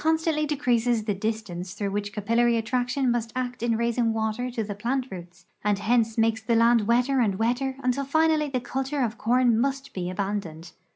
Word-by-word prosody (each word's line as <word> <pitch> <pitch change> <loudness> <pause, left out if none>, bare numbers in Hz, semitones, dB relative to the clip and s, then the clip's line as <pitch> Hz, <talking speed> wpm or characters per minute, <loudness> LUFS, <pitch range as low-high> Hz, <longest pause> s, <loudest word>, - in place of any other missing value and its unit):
'stantly 320 -1 +1
decreases 245 -6 +1
the 210 -1 -1
distance 195 -3 -4
through 200 -1 -2
which 205 0 -3
capillary 230 +3 +2
attraction 250 +3 0
must 235 -1 -2
act 250 -1 -3
in 230 -1 +1
raising 235 0 +1
water 220 +3 -2
to 240 -2 -3
the 205 -1 -4
plant 245 +6 -1
roots, 180 0 -10 0.2
and 205 -1 +2
hence 225 +2 +1
makes 225 0 +2
the 230 +1 +1
land 230 -2 +4
wetter 250 +3 +2
and 210 -5 +2
wetter 245 +4 0
until 255 +2 +1
finally 310 +1 +2
the 260 -2 -1
culture 270 +3 -2
of 230 -1 -3
corn 240 0 +3
must 275 +1 -2
be 180 -2 -3
abandoned. 185 -4 -4
235 Hz, 185 wpm, -26 LUFS, 210-255 Hz, 0.2 s, land